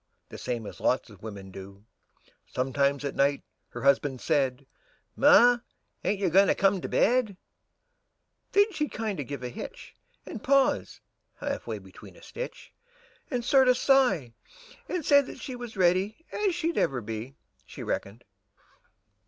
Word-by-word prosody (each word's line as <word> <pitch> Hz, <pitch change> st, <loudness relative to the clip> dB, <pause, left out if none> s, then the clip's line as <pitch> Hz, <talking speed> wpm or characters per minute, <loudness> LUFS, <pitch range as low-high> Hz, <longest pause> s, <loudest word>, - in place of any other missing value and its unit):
The -, -, -9 dB
same 120 Hz, -3 st, -3 dB
as -, -, -9 dB
lots 125 Hz, -2 st, 0 dB
of 100 Hz, -, -16 dB
wimmin 100 Hz, -3 st, -8 dB
do; 100 Hz, +2 st, -11 dB, 0.6 s
Sometimes 140 Hz, +2 st, 0 dB
at 140 Hz, -, -2 dB
night 140 Hz, +1 st, +1 dB, 0.3 s
her -, -, -8 dB
husban' 140 Hz, 0 st, +3 dB
said, 135 Hz, 0 st, 0 dB, 0.5 s
"Ma, 245 Hz, -4 st, +6 dB, 0.4 s
ain't 205 Hz, -, +1 dB
you 195 Hz, -, +1 dB
goin' 195 Hz, +3 st, +6 dB
to -, -, +3 dB
come 195 Hz, -1 st, +2 dB
to -, -, -5 dB
bed?" 245 Hz, +2 st, +3 dB
And 200 Hz, -3 st, -14 dB, 1.2 s
then 405 Hz, +1 st, +4 dB
she'd 300 Hz, -3 st, -2 dB
kinder 215 Hz, -7 st, -3 dB
give 140 Hz, -1 st, -6 dB
a 125 Hz, -, -3 dB
hitch, -, -, -9 dB, 0.3 s
And 220 Hz, -, -8 dB
pause 275 Hz, 0 st, +2 dB, 0.3 s
half -, -, -4 dB
way -, -, -3 dB
between -, -, -14 dB
a -, -, -17 dB
stitch. -, -, -8 dB, 0.6 s
And 245 Hz, -4 st, -2 dB
sorter 260 Hz, -2 st, +5 dB
sigh, 245 Hz, -, +3 dB, 0.6 s
and 355 Hz, -5 st, -2 dB
say 285 Hz, -1 st, +6 dB
that 275 Hz, -, -9 dB
she 260 Hz, -3 st, -6 dB
Was 240 Hz, -3 st, -8 dB
ready 190 Hz, -, +1 dB
as 400 Hz, -4 st, 0 dB
she'd 335 Hz, 0 st, -1 dB
ever 130 Hz, -3 st, 0 dB
be. 115 Hz, +4 st, -6 dB, 0.3 s
She -, -, -8 dB
reckoned. 105 Hz, +5 st, -4 dB
185 Hz, 155 wpm, -28 LUFS, -, 1.2 s, Ma